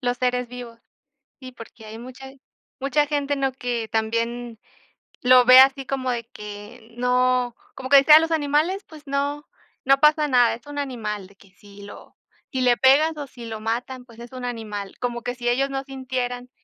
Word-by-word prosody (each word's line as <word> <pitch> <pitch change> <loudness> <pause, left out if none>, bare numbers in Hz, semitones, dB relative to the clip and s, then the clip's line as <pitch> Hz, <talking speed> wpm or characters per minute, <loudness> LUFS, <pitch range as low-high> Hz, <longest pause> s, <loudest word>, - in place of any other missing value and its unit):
los 245 -2 -1
seres 250 0 0
vivos. 245 -2 -10 0.6
Sí, 255 -1 -9
porque 230 -1 -13
hay 220 +1 -9
mucha 255 +2 -10 0.5
mucha 285 +2 +1
gente, 290 -1 -1
¿no?, 270 -1 -1
que 245 -3 -4
también 230 +1 -2 0.6
lo 250 0 +6
ve 255 +1 +9
así 270 0 +5
como 260 -1 -3
de 235 -2 -4
que 210 +2 -11
no, 250 -1 +1 0.2
como 260 -1 -7
que 280 - +8
decían, 300 +3 +8
los 325 0 -2
animales 315 +6 0
pues 310 -1 -14
no, 285 +1 -2 0.4
no 275 +1 +4
pasa 300 0 +4
nada. 245 -4 +3
Es 235 - -17
un 290 - -8
animal 215 -8 -4
de 195 - -22
que 195 - -21
si 200 +1 -16
lo, 200 - -13 0.3
si 260 - -2
le 245 -1 +4
pegas 290 +6 +4
o 290 - -6
si 245 -2 -11
lo 220 -1 -6
matan, 245 +3 -4
pues 230 -2 -17
es 240 +1 -11
un 255 -1 -8
animal. 210 -5 -6
Como 240 -1 -3
que 245 - -4
si 240 -1 -5
ellos 265 +3 +1
no 270 0 -4
sintieran, 250 -2 -5
250 Hz, 190 wpm, -23 LUFS, 235-275 Hz, 0.6 s, ve